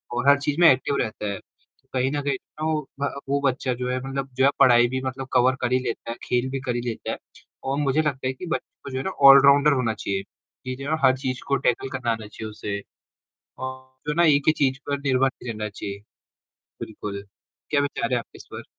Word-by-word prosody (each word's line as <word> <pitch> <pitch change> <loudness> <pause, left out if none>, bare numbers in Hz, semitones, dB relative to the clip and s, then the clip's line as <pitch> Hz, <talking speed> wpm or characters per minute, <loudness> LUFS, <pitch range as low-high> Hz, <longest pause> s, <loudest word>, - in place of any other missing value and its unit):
और 120 +3 +3
हर 140 - +7
चीज़ 145 +3 -2
में 170 - +9
एक्टिव 135 +2 0
रहता 110 -2 -3
है। 100 - -5 0.5
कहीं 130 +1 +1
न 145 0 -1
कहीं 140 -2 -1 0.3
वो 155 -1 +1 0.2
भ 140 - 0 0.2
वो 140 +1 +2
बच्चा 130 -1 0
जो 125 +1 -3
है 125 - 0
मतलब 135 0 -3
जो 135 - +4
है, - - +7
पढ़ाई 120 -1 +6
भी 130 +1 -3
मतलब 130 +1 -4
कवर 130 +1 +4
कर 125 0 0
ही 130 - +3
लेता 115 -2 -4
है, 120 - -6
खेल 125 +1 0
भी 135 0 -3
कर 125 -2 -2
ही 120 - -1
लेता 120 -2 -4
है - - -3 0.5
और 135 +1 -1
मुझे 145 +1 +2
लगता 135 -4 -2
है 130 - -1
कि 155 +8 -8
बच्चों 170 - -5
को 140 - -7
जो 130 - -3
है 130 - -2
ना - - -2 0.2
ऑल-राउंडर 140 +2 +7
होना 115 -3 0
चाहिए 100 -2 -3 0.4
कि 130 0 -3
जो 135 +1 -8
है 150 - -2
ना 160 - +2
हर 130 0 +5
चीज़ 130 -2 -3
को 140 - +2
टैकल 125 +2 0
करना 120 -3 -1
आना 110 -2 -4
चाहिए 110 +1 -7
उसे 105 -1 -4 0.8
और 130 0 -4 0.3
जो 150 - 0
है - - -5
ना, 170 - +5
एक 145 -3 +5
ही - - +7
चीज़ 135 -3 +1
पर 140 0 -1
निर्भर 135 -1 +2
नहीं 125 -2 -8
रहना 105 0 -4
चाहिए। 100 -1 -6 0.8
बिल्कुल, 100 -2 -6 0.5
क्या 145 -1 +2
विचार 140 -4 -2
है - - +3
आपके - - -12
इस - - -13
पर? - - -7
130 Hz, 245 wpm, -24 LUFS, 120-140 Hz, 0.8 s, में